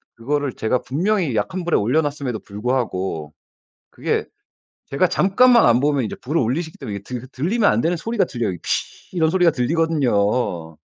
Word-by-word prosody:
그거를 140 +3 -2
제가 120 +3 0
분명히 170 - 0
약한 175 - -2
불에 175 - +1
올려놨음에도 140 0 0
불구하고 100 - -3 0.6
그게 - - -1 0.6
제가 155 +6 +1
잠깐만 235 +7 +4
안보면 135 +2 +3
이제 - - -5
불을 150 +6 -1
올리시기 160 +8 -2
때문에 100 -2 -5
드 125 0 -7
들리면 195 - +1
안 110 - +1
되는 170 +5 +1
소리가 225 +5 0
들려요. 115 -8 -3
"피" 185 - -4
이런 160 -1 +3
소리가 180 -2 +4
들리거든요. 125 - 0
135 Hz, 370 characters per minute, -21 LUFS, 115-165 Hz, 0.6 s, 잠깐만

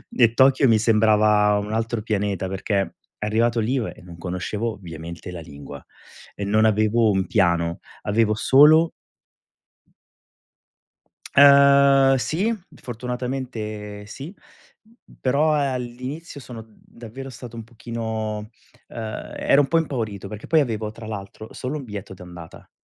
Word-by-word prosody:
E 115 -2 +4
Tokyo 130 +1 +4
mi 110 - +5
sembrava 105 -2 +4
un 105 +1 -5
altro 115 0 -1
pianeta, 100 -3 -2
perché 95 +1 -2 0.3
arrivato 115 +3 +1
lì 115 +3 0
io 125 -5 0
e - - -17
non 85 -1 -12
conoscevo 95 +6 -3
ovviamente 85 -2 -9
la 90 -2 -7
lingua 70 -2 -10 0.6
e 100 - -5
non 105 +2 +2
avevo 110 +1 +3
un 95 -1 0
piano, 85 -5 +1 0.2
avevo 110 +1 +1
solo 150 +8 +5 2.4
Ehm, 140 -1 +6
sì, 190 - 0 0.3
fortunatamente 120 -4 -5
sì, 140 - -9 0.9
però 145 +4 +2
all'inizio 135 +2 -4
sono 115 -2 -10
davvero 115 +4 -11
stato 120 -1 -10
un 115 - -7
pochino, 110 -2 -5 0.4
ehm, 110 -2 -6
ero 140 - +4
un 140 - 0
po' 165 - +3
impaurito, 110 - -3
perché 105 +1 -9
poi 160 - +4
avevo 110 -6 -1
tra 115 0 -11
l'altro 105 0 -8
solo 135 +4 -4
un 140 - -8
biglietto 105 -3 -7
d'andata. 90 -2 -12
110 Hz, 130 wpm, -23 LUFS, 105-130 Hz, 2.4 s, Ehm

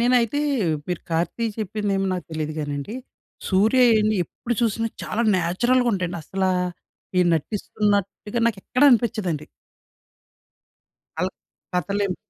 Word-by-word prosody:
నేనైతే 245 +3 +3 0.5
మీరు 180 -2 -2
కార్తీ 170 +8 0
చెప్పిందేమో 205 -2 -1
నాకు 180 -4 -4
తెలియదు 155 -1 -3
గానండి. 145 +7 -4 0.5
సూర్య 215 +7 +4 0.2
ఏన్ని 215 0 +2
ఎప్పుడు 240 +7 -4
చూసినా 230 0 +1
చాలా 235 - -1
నేచురల్‌‌గా 240 +9 +2
ఉంటాయండి. 180 -3 -2
అసలా, 190 +1 0 0.7
ఈ - - +6
నటిస్తున్నట్టుగా 205 +4 -1
నాకు 225 -4 0
ఎక్కడ 255 - 0
అనిపించదండి. 210 - +1 1.7
అలా - - 0 0.4
కథలు 200 +3 0
ఎం 185 - -2
205 Hz, 110 wpm, -23 LUFS, 180-230 Hz, 1.7 s, ఈ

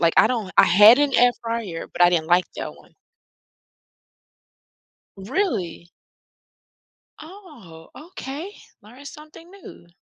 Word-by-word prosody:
like, 165 -1 +1
I - - +5
don't 225 -6 -4
I - - +7
had 210 +8 +6
an 290 -2 0
air 245 0 +4
fryer, 230 -8 -6
but - - -1
I 175 - +5
didn't 165 -3 -1
like 175 +2 +2
that - - -6
one. - - -22 2.3
Really? 195 - -4 1.3
Oh, 300 - -15
okay. 320 +2 -9 0.3
Learned 250 +7 -14
something 310 +3 -15
new. 385 - -15
235 Hz, 120 wpm, -21 LUFS, -, 2.3 s, I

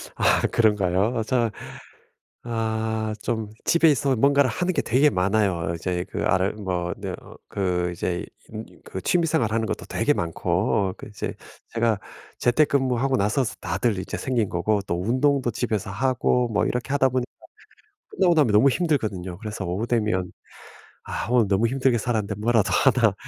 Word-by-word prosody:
아 - - +3
그런가요? 105 +1 +2
저 115 -2 +1 0.9
아 110 -1 -2
좀 110 -2 -2 0.2
집에 170 -1 +4
있으면 140 -4 +1
뭔가를 140 0 +4
하는 180 +9 -1
게 - - +1
되게 135 +5 +3
많아요. 95 -4 0
이제 90 +1 -2
그 - - -3
아르 95 +1 +2
뭐 90 -3 -2
네 - - -5
어 - - -14
그 90 -3 -1
이제 90 0 -3 0.2
인 110 +1 -7 0.2
그 95 - -6
취미생활 160 -10 +1
하는 115 -1 +1
것도 - - -4
되게 - - 0
많고 90 +3 0
그 - - -10
이제 105 -2 -5 0.4
제가 115 -3 0 0.4
재택근무하고 130 -1 +2
나서 110 +6 +1
스 110 - -5
다들 115 -4 -1
이제 95 - -5
생긴 120 -6 -1
거고 100 +4 0
또 85 +1 -1
운동도 130 +3 +1
집에서 110 -4 -2
하고 125 +1 +1
뭐 100 -2 +1
이렇게 125 +2 -2
하다 135 -2 +3
보니까 125 0 -2 0.8
끝나고 180 -3 +3
나면 145 -7 +3
너무 110 +7 +6
힘들거든요. 110 - -1
그래서 105 -3 -5
오후 95 +6 -2
되면 105 -6 0 0.7
아 - - -4
오늘 120 -4 +4
너무 100 +4 +2
힘들게 130 0 +1
살았는데 110 -3 -1
뭐라도 110 0 +1
하나 - - +4
110 Hz, 320 characters per minute, -24 LUFS, 100-130 Hz, 0.9 s, 너무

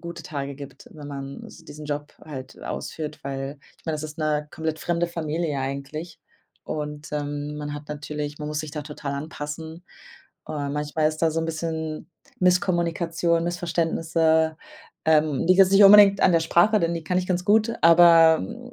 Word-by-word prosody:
gute 170 0 -8
Tage 140 -2 -5
gibt, 140 -1 -11
wenn 150 -2 -10
man 140 -1 -7
s 165 - -14
diesen 150 -1 -10
Job 145 0 -4
halt 130 -4 -9
ausführt, 155 -2 -6
weil 135 +1 -5 0.2
ich - - -28
mein, 160 - -1
das 150 - -5
ist 155 +1 -8
'ne 150 -1 -1
komplett 160 0 -3
fremde 175 0 0
Familie 160 -2 -3
eigentlich. 140 +5 -5 0.4
Und, 150 0 -5
ähm, 145 0 -4
man 150 0 -5
hat 145 0 -9
natürlich 150 0 -5
man 150 -1 -5
muss 150 0 -2
sich 155 -2 -7
da 150 -1 -4
total 145 -1 -6
anpassen. 160 +3 -7 0.6
Äh, 145 -2 -3
manchmal 150 +2 0
ist 155 0 -6
da 165 - +4
so 160 +1 -1
'n 165 - -2
bisschen 160 0 -4 0.3
Misskommunikation, 170 -2 +1
Missverständnisse. 165 -2 +1 0.5
Ähm, 155 -2 +2
liegt 185 +2 +4
jetzt 190 0 +5
nicht 200 +1 +7
unbedingt 200 0 +8
an 185 - +5
der 165 - +4
Sprache, 175 +6 +3
denn 170 0 +1
die 165 -1 -5
kann 180 +2 -1
ich 180 - -2
ganz 180 -1 0
gut. 220 +3 +3
Aber 165 -1 +7
mhm 95 - -8
160 Hz, 180 wpm, -24 LUFS, 150-170 Hz, 0.6 s, unbedingt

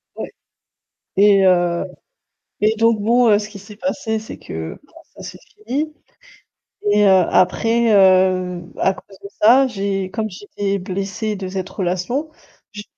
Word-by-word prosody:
Ouais - - -7 0.8
et 200 -1 +5
heu, 175 -2 +2 0.8
et 215 +1 +3
donc 230 -1 +3
bon, 235 +2 +3
heu, 205 0 +5
ce 210 0 -7
qui 205 - -11
s'est 205 +1 -13
passé 240 -4 -2
c'est 220 - -10
que, 80 0 -7
bah, - - -30 0.2
ça - - -11
s'est - - -9 0.3
fini 300 +4 -2 1.0
et 210 0 +4
heu, 195 - +6 0.2
après, 225 +5 +2
heu, 185 -2 +3 0.2
à 190 - +2
cause 195 0 -16
de - - -6
ça 255 +5 +6
j'ai 195 -4 -3
comme 220 0 -3
j'étais 200 +1 -4
blessée 195 +3 -4
de 190 -1 -6
cette 190 -1 -4
relation, 190 - -2 0.4
j'ai 210 0 -8
200 Hz, 155 wpm, -19 LUFS, 185-220 Hz, 1.0 s, heu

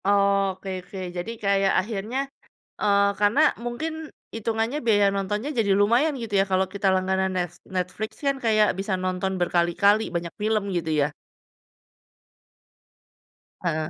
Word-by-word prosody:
Oke, 200 -1 +2
oke. 190 - -11 0.2
Jadi 175 +6 -3
kayak 195 -1 +3
akhirnya, 215 +5 -4 0.6
eee, 200 -1 +4
karena 210 +6 +3 0.3
mungkin 275 +7 -3 0.4
itungannya 225 +4 -1
biaya 205 -3 +4
nontonnya 210 +7 -2
jadi 205 -3 +2
lumayan 240 +9 +3
gitu 220 -2 -7
ya, - - +1
kalau 190 0 +3
kita 200 0 -1
langganan 190 0 +1
Net 175 -2 -1 0.2
Netflix 185 +4 -2
kan 275 -1 +2
kayak 215 -1 +4
bisa 195 0 -2
nonton 185 +1 -1
berkali-kali, 175 +5 +3
banyak 170 0 -3
film 215 0 +1
gitu 165 -2 -3
ya? 145 +1 +1 2.5
Heeh. 160 -3 -1
200 Hz, 130 wpm, -25 LUFS, 185-215 Hz, 2.5 s, eee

